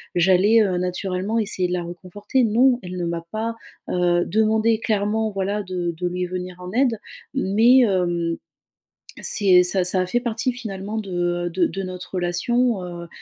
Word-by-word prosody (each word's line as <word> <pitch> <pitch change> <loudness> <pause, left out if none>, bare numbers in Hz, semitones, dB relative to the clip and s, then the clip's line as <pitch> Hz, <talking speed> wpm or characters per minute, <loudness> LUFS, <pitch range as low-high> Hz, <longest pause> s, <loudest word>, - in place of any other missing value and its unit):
j'allais, 190 +5 +4
heu, 185 -3 0
naturellement 185 +3 -2
essayer 195 -4 0
de - - -2
la 180 -1 -1
réconforter. 185 +8 -2
Non, 240 +3 +3
elle 180 0 -6
ne 175 - -2
m'a 170 0 -3
pas, 225 +1 -3 0.3
heu, 175 -1 +2
demandé 220 +2 +2
clairement 220 0 0
voilà 200 +1 -2
de 180 -2 -3
de 180 +1 -2
lui 180 +1 -2
venir 180 0 -5
en 180 0 -8
aide, 245 -1 +2 0.4
mais, 235 +2 +4
hem, 175 -6 +1 0.9
c'est 185 -4 +4
ça 185 +1 +1
ça 185 +1 +2
a 185 - 0
fait 240 +7 0
partie 240 +1 -1
finalement 215 -4 -6
de, 205 -3 -6 0.4
heu, - - -2
de 175 0 +1
de 195 - -4
notre 185 0 -8
relation, 190 +5 0
heu, 175 -1 -7
190 Hz, 175 wpm, -22 LUFS, 180-220 Hz, 0.9 s, j'allais